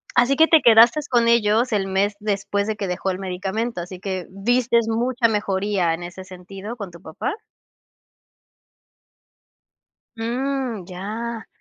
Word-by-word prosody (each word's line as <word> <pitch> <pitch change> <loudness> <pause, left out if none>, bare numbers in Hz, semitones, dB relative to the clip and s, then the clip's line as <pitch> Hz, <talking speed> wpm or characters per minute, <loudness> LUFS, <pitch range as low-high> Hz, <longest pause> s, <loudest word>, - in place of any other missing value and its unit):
Así 250 +3 +4
que 320 +3 +5
te 320 -2 +6
quedaste 235 +6 +6
con 235 -2 +3
ellos 230 +1 +3
el 195 -2 0
mes 200 +2 0
después 200 -1 -1
de 220 - -1
que 200 -2 -4
dejó 180 +2 -2
el 185 - -5
medicamento, 195 +3 -3
así 180 +1 -8
que 190 -2 -4
¿viste 235 +3 +1
mucha 240 +1 +1
mejoría 200 -4 0
en 175 +1 -5
ese 175 +2 -8
sentido 190 +4 -9
con 200 -6 -7
tu 170 -1 -14
papá? 160 - -4 2.8
Mm. 245 -2 -2
Ya. 220 +5 -5
210 Hz, 140 wpm, -22 LUFS, 190-235 Hz, 2.8 s, te